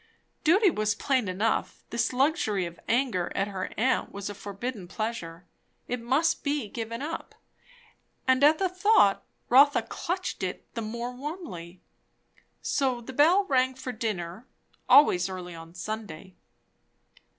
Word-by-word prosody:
Duty 370 Hz, +4 st, +5 dB
was 215 Hz, -5 st, 0 dB
plain 260 Hz, -6 st, 0 dB
enough. 195 Hz, +5 st, -1 dB
This 235 Hz, -1 st, 0 dB
luxury 255 Hz, -, +1 dB
of 170 Hz, 0 st, -9 dB
anger 230 Hz, -8 st, +1 dB
at 200 Hz, +1 st, 0 dB
her 190 Hz, -2 st, -4 dB
aunt 255 Hz, +3 st, +1 dB
was 200 Hz, 0 st, -5 dB
a -, -, -6 dB
forbidden 205 Hz, +1 st, -6 dB
pleasure; 180 Hz, -5 st, -5 dB, 0.4 s
it 245 Hz, -1 st, -3 dB
must 295 Hz, +8 st, +1 dB
be 285 Hz, -5 st, -1 dB
given 230 Hz, +3 st, -5 dB
up; 325 Hz, +2 st, -6 dB, 0.9 s
and 260 Hz, +1 st, +4 dB
at 305 Hz, +2 st, +6 dB
the 385 Hz, -, +1 dB
thought, 365 Hz, -, +3 dB, 0.2 s
Rotha 280 Hz, +4 st, +6 dB
clutched 370 Hz, +2 st, -4 dB
it 185 Hz, -1 st, -4 dB
the 230 Hz, -, -3 dB
more 235 Hz, +3 st, -4 dB
warmly. 250 Hz, -, -7 dB, 0.8 s
So 260 Hz, -4 st, 0 dB
the 240 Hz, +3 st, -9 dB
bell 330 Hz, +9 st, +5 dB
rang 260 Hz, -4 st, +2 dB
for 260 Hz, 0 st, -5 dB
dinner, 215 Hz, -2 st, -4 dB, 0.4 s
always 185 Hz, -11 st, +6 dB
early 180 Hz, -2 st, -6 dB
on 165 Hz, +1 st, -11 dB
Sunday. 195 Hz, -1 st, -6 dB
235 Hz, 140 wpm, -27 LUFS, 195-280 Hz, 0.9 s, at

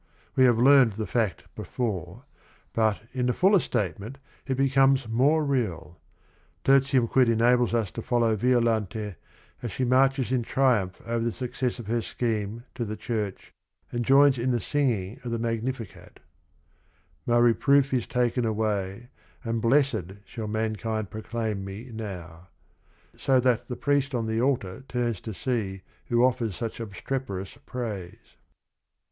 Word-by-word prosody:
We 130 Hz, -, +5 dB
have 120 Hz, -3 st, +4 dB
learned 130 Hz, -2 st, +6 dB
the 110 Hz, +2 st, -3 dB
fact 110 Hz, -1 st, -1 dB
before, 105 Hz, -9 st, -4 dB, 0.5 s
but 110 Hz, -2 st, +1 dB
in 125 Hz, -1 st, 0 dB
the 125 Hz, -, +2 dB
fuller 195 Hz, -, +4 dB
statement 105 Hz, -, -3 dB, 0.3 s
it 130 Hz, -2 st, -1 dB
becomes 135 Hz, -1 st, +3 dB
more 140 Hz, +8 st, +3 dB
real. 110 Hz, -, -2 dB, 0.6 s
Tertium 135 Hz, -2 st, +4 dB
Quid 125 Hz, 0 st, +3 dB
enables 120 Hz, +1 st, +3 dB
us 110 Hz, -5 st, 0 dB
to 115 Hz, -, -6 dB
follow 115 Hz, -2 st, +1 dB
Violante 110 Hz, -3 st, +1 dB, 0.5 s
as 120 Hz, -, -4 dB
she 130 Hz, +7 st, -1 dB
marches 130 Hz, 0 st, +3 dB
in 130 Hz, -2 st, +2 dB
triumph 115 Hz, -7 st, +1 dB
over 115 Hz, 0 st, -1 dB
the 115 Hz, -, 0 dB
success 125 Hz, +1 st, -3 dB
of 120 Hz, -, -8 dB
her 115 Hz, +3 st, 0 dB
scheme 110 Hz, -1 st, -3 dB
to 120 Hz, -, -3 dB
the 110 Hz, -1 st, -5 dB
church 105 Hz, -5 st, -4 dB, 0.4 s
and 120 Hz, 0 st, -1 dB
joins 135 Hz, +1 st, +5 dB
in 125 Hz, +2 st, 0 dB
the 120 Hz, -2 st, +1 dB
singing 120 Hz, -6 st, -1 dB
of 120 Hz, -, -4 dB
the 115 Hz, -, -1 dB
Magnificat: 115 Hz, 0 st, -4 dB, 0.4 s
" -, -, -39 dB
' 80 Hz, -5 st, -38 dB
My 120 Hz, -, +3 dB
reproof 135 Hz, +4 st, +4 dB
is 125 Hz, -3 st, 0 dB
taken 125 Hz, 0 st, 0 dB
away 110 Hz, 0 st, -2 dB, 0.3 s
And 115 Hz, -1 st, -2 dB
blessed 115 Hz, -, +2 dB
shall 110 Hz, 0 st, -6 dB
mankind 110 Hz, -1 st, -2 dB
proclaim 110 Hz, -2 st, -3 dB
me 100 Hz, +6 st, -8 dB
now.' 90 Hz, -6 st, -7 dB, 0.4 s
" -, -, -39 dB, 0.3 s
so 130 Hz, -1 st, +2 dB
that 125 Hz, -2 st, +1 dB
the 125 Hz, -, -5 dB
priest 140 Hz, -1 st, +1 dB
on 115 Hz, -2 st, -1 dB
the 110 Hz, +1 st, 0 dB
altar 125 Hz, -7 st, -1 dB
turns 120 Hz, -5 st, -2 dB
to 110 Hz, -, -6 dB
see 100 Hz, -7 st, -2 dB, 0.2 s
who 120 Hz, 0 st, +3 dB
offers 120 Hz, -6 st, 0 dB
such 115 Hz, -1 st, -5 dB
obstreperous 105 Hz, -2 st, -5 dB
praise. 105 Hz, -8 st, -6 dB
115 Hz, 155 wpm, -26 LUFS, 110-130 Hz, 0.6 s, learned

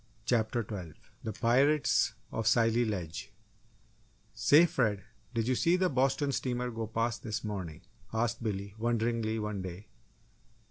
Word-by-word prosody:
CHAPTER 115 Hz, 0 st, +1 dB
TWELVE 95 Hz, -7 st, -9 dB
THE 110 Hz, -, -3 dB
PIRATES 120 Hz, -1 st, +3 dB, 0.2 s
OF 115 Hz, -1 st, -2 dB
SCILLY 115 Hz, +1 st, +4 dB
LEDGE 90 Hz, -7 st, -4 dB, 1.0 s
"Say, 155 Hz, +4 st, +6 dB
Fred, 110 Hz, -, 0 dB, 0.3 s
did 115 Hz, 0 st, 0 dB
you 130 Hz, -, +3 dB
see 170 Hz, +7 st, +3 dB
the 185 Hz, 0 st, +2 dB
Boston 135 Hz, +2 st, +2 dB
steamer 125 Hz, -2 st, -2 dB
go 115 Hz, -1 st, -4 dB
past 115 Hz, +2 st, -1 dB
this 110 Hz, -2 st, -4 dB
morning?" 95 Hz, -7 st, -5 dB, 0.3 s
asked 115 Hz, +1 st, -1 dB
Billy, 100 Hz, -3 st, -3 dB
wonderingly, 115 Hz, -1 st, 0 dB
one 105 Hz, -2 st, -3 dB
day. 95 Hz, +2 st, -8 dB
115 Hz, 135 wpm, -31 LUFS, 105-125 Hz, 1.0 s, Say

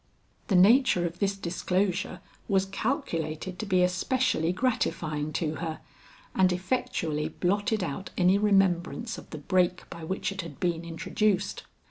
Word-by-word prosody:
The 195 Hz, -, +2 dB
nature 200 Hz, -1 st, +5 dB
of 170 Hz, +1 st, -4 dB
this 200 Hz, -1 st, 0 dB
disclosure 180 Hz, 0 st, -1 dB, 0.3 s
was 195 Hz, -2 st, +2 dB
calculated 185 Hz, -, -3 dB
to 215 Hz, -, -4 dB
be 185 Hz, -2 st, +3 dB
especially 180 Hz, -1 st, +1 dB
gratifying 165 Hz, -, -1 dB
to 155 Hz, -2 st, -1 dB
her, 160 Hz, -2 st, -4 dB, 0.5 s
and 185 Hz, -1 st, +4 dB
effectually 180 Hz, -6 st, -1 dB
blotted 205 Hz, +5 st, 0 dB
out 175 Hz, +3 st, -4 dB
any 185 Hz, +2 st, +4 dB
remembrance 195 Hz, +2 st, +1 dB
of -, -, -15 dB
the 155 Hz, -, -6 dB
break 180 Hz, +4 st, +1 dB
by 170 Hz, -, -8 dB
which 190 Hz, +4 st, -2 dB
it 195 Hz, -1 st, -4 dB
had 165 Hz, -5 st, -10 dB
been 170 Hz, -2 st, 0 dB
introduced. 195 Hz, +4 st, -1 dB
180 Hz, 140 wpm, -28 LUFS, 170-200 Hz, 0.5 s, nature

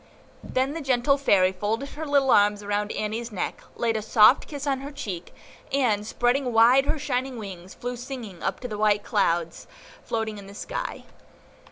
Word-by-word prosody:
Then 260 Hz, +2 st, -1 dB
the 330 Hz, -, -4 dB
gentle 270 Hz, 0 st, +2 dB
Fairy 200 Hz, -10 st, +3 dB
folded 215 Hz, +8 st, -2 dB
her 315 Hz, +1 st, -6 dB
little 280 Hz, -2 st, +3 dB
arms 205 Hz, -1 st, +4 dB
around 205 Hz, +1 st, -1 dB
Annie's 225 Hz, +2 st, -3 dB
neck, 190 Hz, -, -4 dB
laid 230 Hz, -1 st, 0 dB
a 220 Hz, -, -1 dB
soft 215 Hz, +3 st, +5 dB
kiss 285 Hz, -2 st, -6 dB
on 275 Hz, -2 st, 0 dB
her 280 Hz, +2 st, -7 dB
cheek, 190 Hz, -, -6 dB, 0.4 s
and, 225 Hz, -7 st, +1 dB
spreading 245 Hz, +2 st, +1 dB
wide 240 Hz, +4 st, +5 dB
her -, -, +1 dB
shining 260 Hz, -2 st, -2 dB
wings, 190 Hz, -4 st, -8 dB
flew 245 Hz, 0 st, -4 dB
singing 240 Hz, -7 st, -8 dB
up 190 Hz, -, -2 dB
among 250 Hz, -, -4 dB
the 210 Hz, -, -3 dB
white 210 Hz, -1 st, +3 dB
clouds 170 Hz, -6 st, 0 dB, 0.4 s
floating 220 Hz, -2 st, -3 dB
in 195 Hz, -, -11 dB
the 200 Hz, -, -12 dB
sky. -, -, -5 dB
230 Hz, 180 wpm, -25 LUFS, 205-270 Hz, 0.4 s, soft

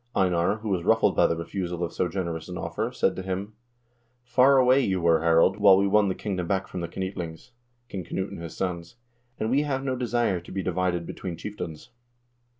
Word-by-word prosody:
Einar, 90 Hz, +1 st, +2 dB
who 110 Hz, -, -3 dB
was 90 Hz, -3 st, 0 dB
ruffled -, -, +3 dB
by -, -, +5 dB
the 85 Hz, -, 0 dB
refusal 85 Hz, +1 st, -4 dB
of 85 Hz, -, -3 dB
so 90 Hz, -, 0 dB
generous 85 Hz, -2 st, -4 dB
an 90 Hz, -, -5 dB
offer, 85 Hz, +8 st, -3 dB
said 95 Hz, -6 st, +1 dB
to -, -, -4 dB
him: 95 Hz, +3 st, -4 dB, 0.7 s
"Far 130 Hz, +3 st, +4 dB
away 130 Hz, +1 st, +5 dB
you 95 Hz, -7 st, 0 dB
were, 85 Hz, -2 st, +3 dB
Harald, 85 Hz, +4 st, +4 dB
while 100 Hz, -2 st, +7 dB
we 100 Hz, -, +3 dB
won 100 Hz, +1 st, +4 dB
the 95 Hz, -, -1 dB
kingdom 90 Hz, -4 st, -3 dB
back 95 Hz, 0 st, 0 dB
from 90 Hz, -, -6 dB
the 85 Hz, -, -3 dB
Knytlings 90 Hz, +1 st, -6 dB, 0.4 s
(King 95 Hz, -5 st, -5 dB
Knut 95 Hz, +4 st, -3 dB
and 100 Hz, -3 st, -8 dB
his 85 Hz, -1 st, -8 dB
sons), 85 Hz, 0 st, -3 dB, 0.4 s
and 110 Hz, +1 st, -1 dB
we 140 Hz, +3 st, +3 dB
have 135 Hz, -2 st, -2 dB
no 130 Hz, -1 st, -1 dB
desire 120 Hz, -6 st, 0 dB
to 85 Hz, -, -13 dB
be 95 Hz, 0 st, -3 dB
divided 90 Hz, -1 st, -1 dB
between 85 Hz, -1 st, -6 dB
chieftains. 90 Hz, -1 st, -7 dB
95 Hz, 210 wpm, -26 LUFS, 85-105 Hz, 0.7 s, while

